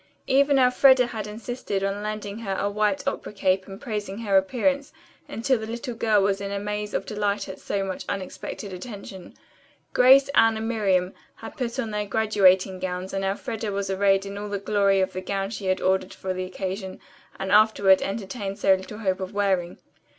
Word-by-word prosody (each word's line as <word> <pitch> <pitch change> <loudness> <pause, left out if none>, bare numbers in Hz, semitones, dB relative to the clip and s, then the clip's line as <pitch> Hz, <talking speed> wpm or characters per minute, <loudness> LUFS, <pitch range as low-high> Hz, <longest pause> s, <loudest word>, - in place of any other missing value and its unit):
Even 280 +1 +4
Elfreda 255 0 +5
had 220 -3 -5
insisted 215 -2 -4
on 195 +1 -1
lending 210 0 -5
her 195 -4 -3
a 200 - -1
white 215 +7 0
opera 275 - -3
cape 190 -2 0
and 195 0 -9
praising 210 -3 -4
her 210 -4 -1
appearance 270 +8 +1 0.4
until 245 +2 0
the 220 - -6
little 235 +2 -5
girl 220 -3 +2
was 195 0 +1
in 200 0 -4
a 200 - -2
maze 210 +1 -4
of - - -1
delight 205 -1 -1
at 190 - -8
so 200 -1 -2
much 190 -1 -4
unexpected 195 0 -5
attention. 195 -2 -9 0.6
Grace, 265 +2 +7
Anne, 225 -4 +4
and 220 0 -3
Miriam 195 -5 +1 0.2
had - - -10
put 245 -1 -3
on 230 -5 -2
their 210 0 -2
graduating 195 -3 +3
gowns 185 0 -4
and 195 0 -2
Elfreda 215 +2 -3
was 195 -1 -2
arrayed 195 0 +2
in 200 0 -6
all 210 0 -5
the 200 - -2
glory 200 -1 +2
of 190 - -1
the 185 - -4
gown 195 +1 -3
she 205 -3 -5
had 185 0 +1
ordered 190 0 0
for 190 -1 -3
the 185 0 -3
occasion 190 +1 -5 0.4
and 190 0 -3
afterward 205 -3 +5
entertained 200 0 -4
so 195 -2 +4
little 190 +2 -4
hope 190 -3 -1
of 190 +2 -6
wearing. 190 -4 0
200 Hz, 195 wpm, -25 LUFS, 190-220 Hz, 0.6 s, Grace